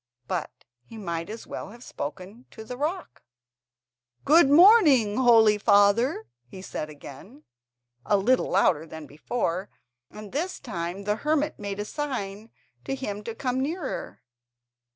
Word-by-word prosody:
But - - -2 0.3
he 225 - -13
might 170 -4 -4
as 225 +2 -8
well - - -7
have 235 +3 -13
spoken 195 - -8
to 220 - -11
the 250 +3 -7
rock. 320 +8 -4 1.0
"Good 310 0 +6
morning, 295 - +6
holy 225 -4 +5
father," 210 +4 +3 0.2
he 190 - -11
said 155 - -5
again, 155 - -13 0.6
a 205 - +2
little 250 +6 +2
louder 170 -4 +2
than 160 -1 -9
before, 175 - -3 0.4
and 210 -1 -11
this 335 +7 -3
time 180 -3 -5
the 210 +1 -1
hermit 300 +3 -1
made 200 -1 -5
a 205 - -3
sign 220 -6 -5 0.3
to 270 - -3
him 210 -6 -5
to 230 - -5
come 255 +1 -2
nearer. 305 +1 -5
220 Hz, 140 wpm, -26 LUFS, 195-270 Hz, 1.0 s, Good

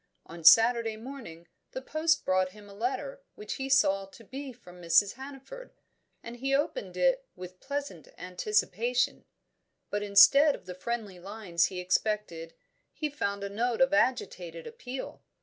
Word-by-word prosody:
On 165 0 -11
Saturday 225 +4 +6
morning 220 -9 -10 0.3
the 260 - -5
post 310 +2 +1
brought 185 0 +1
him 210 -1 -14
a 200 - -13
letter 270 - -3
which 425 - -6
he 270 -1 -4
saw 195 -8 +3
to 210 +4 -16
be 270 +4 -7
from 180 -7 -15
Mrs. 175 +4 +4
Hannaford, 275 - -10 0.5
and 235 +1 -8
he 270 +2 0
opened 300 - -2
it - - +2
with 180 0 -10
pleasant 280 - -5
anticipation; 210 +6 -1 0.7
but 205 - -1
instead 210 +9 +6
of - - -15
the 180 - -7
friendly 200 0 -5
lines 190 -3 -1
he 185 - -4
expected 180 -3 -2 0.4
he 305 -2 -4
found 200 -8 -3
a - - -2
note 230 +3 -1
of 265 +2 +3
agitated 180 - 0
appeal. 250 +3 -7
225 Hz, 150 wpm, -29 LUFS, 185-270 Hz, 0.7 s, Saturday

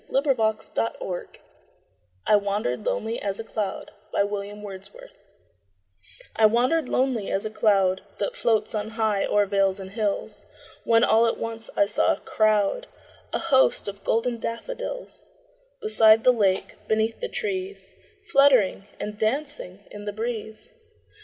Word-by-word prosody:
William 275 0 +2
Wordsworth 220 -4 -2 0.9
I 210 - +5
Wandered 200 -11 -1
Lonely 225 +1 -2
As 200 0 -2
a - - -3
Cloud 210 -3 -4 0.3
I - - +4 2.2
WANDERED 245 +7 +3
lonely 250 -6 0
as 195 - -1
a 215 - -3
cloud 195 -4 +2 0.2
That - - -2
floats 220 - +1
on 215 0 -2
high 215 -3 +1
o'er 205 0 +3
vales 195 -1 +1
and 190 0 -8
hills, 210 -2 -3 0.4
When 230 0 +4
all 230 0 +4
at - - -1
once 225 0 -5
I 200 - +5
saw 205 - +2
a - - -7
crowd, 215 - +1 0.4
A - - 0
host, 270 -10 +3
of 200 0 -7
golden 230 +1 0
daffodils; - - -6 0.5
Beside 225 - +6
the 250 - +6
lake, 195 -5 0
beneath 220 +1 0
the 485 - -4
trees, 395 -2 -4 0.4
Fluttering 255 -8 +4
and 210 0 -5
dancing 220 -6 -2
in 205 0 -9
the 205 - -3
breeze. 220 - -5
220 Hz, 135 wpm, -25 LUFS, 205-245 Hz, 2.2 s, Beside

